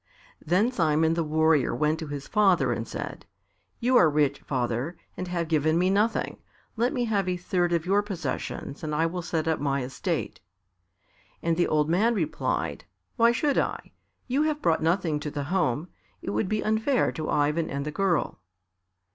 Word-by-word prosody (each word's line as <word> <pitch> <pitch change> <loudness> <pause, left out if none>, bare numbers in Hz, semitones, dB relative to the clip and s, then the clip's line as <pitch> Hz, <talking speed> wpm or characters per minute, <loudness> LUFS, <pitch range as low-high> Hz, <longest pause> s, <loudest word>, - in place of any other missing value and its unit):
Then 190 +9 +2
Simon 160 -6 +2
the 165 0 0
Warrior 155 -2 +2
went 155 +1 +1
to 160 - -5
his 145 -1 -6
father 185 - +3
and 115 -1 -4
said, - - -6 0.6
"You 250 +2 +3
are 165 - +6
rich, 145 -2 +1
father; 125 +5 -2 0.2
and 185 - -5
have 170 -2 -2
given 155 0 +2
me 180 +2 +2
nothing, 210 +3 0 0.4
let 240 +3 +1
me 245 -4 -1
have 200 -5 0
a 180 - -1
third 175 0 0
of 170 -1 0
your 200 +3 +3
possessions 170 -6 -5
and 150 -1 -2
I 160 +2 +2
will 175 +2 -2
set 165 -2 -2
up 160 -1 +1
my 140 -2 0
estate." 125 - -3 1.0
And 165 0 +2
the 175 - +2
old 150 -1 +2
man 210 +8 +2
replied, 160 -7 -2 0.3
"Why 235 -1 +5
should 280 +4 +1
I? - - -3 0.3
You 265 +3 0
have 305 -1 0
brought 165 - +1
nothing 165 -2 +1
to 150 - -4
the 145 0 -4
home. 160 -2 0 0.4
It - - -3
would 110 - -1
be 215 0 0
unfair 220 +5 +1
to 155 -2 -5
Ivan 150 +3 +1
and 140 0 -3
the 150 - -3
girl." 185 - 0
165 Hz, 180 wpm, -26 LUFS, 150-195 Hz, 1.0 s, are